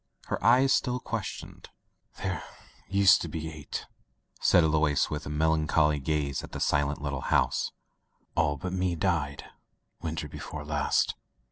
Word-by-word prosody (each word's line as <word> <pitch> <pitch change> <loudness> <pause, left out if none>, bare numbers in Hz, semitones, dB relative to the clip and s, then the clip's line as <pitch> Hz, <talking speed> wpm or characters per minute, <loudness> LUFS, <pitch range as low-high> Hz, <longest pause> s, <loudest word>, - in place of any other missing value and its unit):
Her - - -2
eyes 130 +3 +5
still 125 -1 +1
questioned. 115 -4 -6 0.5
"There 95 -3 -2 0.5
used 100 0 +6
to - - -3
be 80 -1 -5
eight," 75 -1 -6 0.6
said 90 - +5
Alois, 75 -2 +2
with 75 -2 -4
a - - -4
melancholy 75 0 +2
gaze 70 -1 -1
at - - -10
the - - -4
silent 70 0 +1
litde 70 -2 -3
house. - - +1 0.6
"All 75 0 +1
but 90 +4 -4
me 90 -1 0
died 80 -5 -1 0.6
winter 80 -1 -3
before 75 +1 -7
last." 75 -1 +1
80 Hz, 140 wpm, -28 LUFS, 75-90 Hz, 0.6 s, used